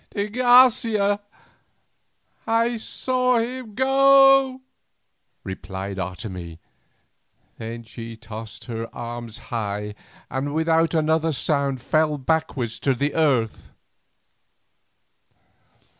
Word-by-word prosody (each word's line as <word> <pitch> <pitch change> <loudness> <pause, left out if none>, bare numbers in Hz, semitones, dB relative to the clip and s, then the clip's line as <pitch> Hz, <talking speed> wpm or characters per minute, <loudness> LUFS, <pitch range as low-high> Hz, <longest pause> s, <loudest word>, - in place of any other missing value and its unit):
"De 205 0 -1
Garcia! 230 -4 +4 1.3
I 230 +1 +2
saw 250 +2 0
him 235 -2 -4
go," 270 0 +5 0.8
replied 95 0 -6
Otomie; 90 -2 -6 1.0
then 115 +1 -6
she 115 0 -9
tossed 110 -1 -9
her 115 -2 -5
arms 120 -1 -6 0.2
high, 105 -2 -3 0.4
and 145 +2 -2
without 160 +1 +2
another 160 +1 +2
sound 140 -1 -1
fell 155 +1 +1
backwards 135 -5 -1
to 135 -2 +1
the 145 +4 -1
earth. 130 -9 0
150 Hz, 85 wpm, -23 LUFS, -, 1.3 s, go